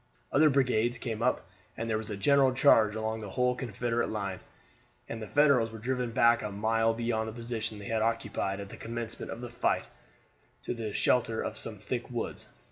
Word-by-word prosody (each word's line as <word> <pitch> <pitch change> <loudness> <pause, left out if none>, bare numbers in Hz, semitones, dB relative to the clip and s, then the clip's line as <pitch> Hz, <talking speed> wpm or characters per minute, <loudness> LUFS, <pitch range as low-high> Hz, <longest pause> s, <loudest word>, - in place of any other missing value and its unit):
Other 155 +2 +5
brigades 125 -4 +2
came 115 -2 -4
up, 125 +1 +1 0.3
and 115 - -3
there 110 -1 0
was 110 - -7
a 105 - -4
general 135 +4 +4
charge 110 -6 +5
along 110 0 -2
the 105 -2 -7
whole 125 +5 +1
Confederate 120 -1 -2
line, 100 -3 -3 0.7
and 115 -1 -6
the 110 - -5
Federals 140 -6 +4
were 110 - -8
driven 125 +2 -1
back 115 +1 +4
a 105 - -3
mile 115 +2 +1
beyond 115 -1 -1
the - - -7
position 115 -2 -4
they 100 - -9
had 110 +1 0
occupied 110 -3 -1
at 100 -1 -7
the - - -10
commencement 115 0 -5
of 115 - -6
the 120 - -6
fight 120 - 0 0.8
to - - -2
the 115 -3 -4
shelter 115 0 +2
of - - -4
some - - -4
thick - - -4
woods. - - -4
115 Hz, 200 wpm, -30 LUFS, 110-120 Hz, 0.8 s, Other